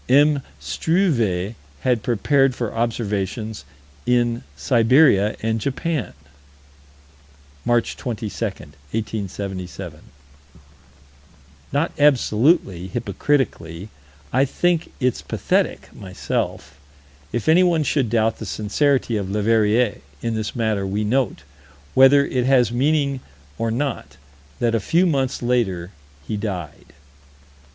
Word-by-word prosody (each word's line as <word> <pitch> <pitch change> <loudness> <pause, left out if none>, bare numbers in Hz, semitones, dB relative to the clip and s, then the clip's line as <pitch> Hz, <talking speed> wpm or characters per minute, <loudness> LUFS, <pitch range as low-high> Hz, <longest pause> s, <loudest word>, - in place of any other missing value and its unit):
M. 145 +2 +5 0.2
Struve 120 - 0 0.3
had 125 -4 +1
prepared 130 +4 +2
for 120 -3 -3
observations 110 -4 -2 0.4
in 120 -1 +2 0.2
Siberia 110 - +4
and 110 0 0
Japan 140 +1 -2 1.5
March 120 -1 +1
22, 120 -4 -4 0.2
1877 95 0 -5 1.7
Not 145 +5 0
absolutely, 120 - +3
hypocritically, 100 - -2 0.4
I 130 +3 +4
think 170 +4 0
it's 125 -2 0
pathetic, - - -1
myself. 95 -1 -4 0.5
If 120 -1 -3
anyone 170 -1 +4
should 140 -4 +1
doubt 110 0 +1
the 110 - -6
sincerity 115 +4 +1
of 100 -2 -3
Leverrier, 110 +2 +2 0.2
in 115 - -1
this 110 -1 -3
matter, 110 -4 0
we 100 +2 -1
note, 120 - 0 0.5
whether 135 +2 +6
it 125 -2 -1
has 125 -4 +4
meaning 140 +2 +1 0.4
or 115 0 0
not, 120 - -3 0.4
that 120 -1 +1
a 115 - +2
few 170 - +2
months 135 -7 0
later 100 -8 0 0.4
he 105 - -2
died. 95 -7 -6
115 Hz, 100 wpm, -22 LUFS, 105-135 Hz, 1.7 s, whether